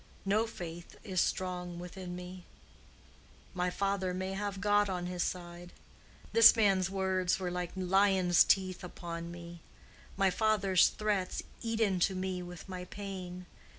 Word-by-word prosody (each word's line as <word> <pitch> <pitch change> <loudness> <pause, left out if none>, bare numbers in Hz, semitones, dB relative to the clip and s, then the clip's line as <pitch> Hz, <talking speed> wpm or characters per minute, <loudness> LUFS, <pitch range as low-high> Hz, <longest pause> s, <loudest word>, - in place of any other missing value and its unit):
No 215 +3 +2
faith 175 -5 -8
is 185 -4 0
strong 180 -1 -2
within 180 +1 -7
me. 180 0 -8 1.1
My 180 -1 0
father 195 -1 -1
may 190 +1 -3
have 200 0 -3
God 205 0 +3
on 180 -2 -2
his 180 0 -3
side. 175 0 -5 0.6
This 230 +1 +9
man's 195 -4 +3
words 190 -1 0
were 180 -1 -2
like 180 -1 -3
lion's 190 -1 +4
teeth 185 -2 +1
upon 170 -1 -6
me. 170 -1 -10 0.6
My 195 -1 +3
father's 200 -3 +3
threats 205 -3 -1 0.2
eat 225 -1 -2
into 190 -3 +2
me 185 -1 -2
with 175 0 -9
my 185 -1 -6
pain. 185 -2 -7
185 Hz, 140 wpm, -32 LUFS, 180-195 Hz, 1.1 s, This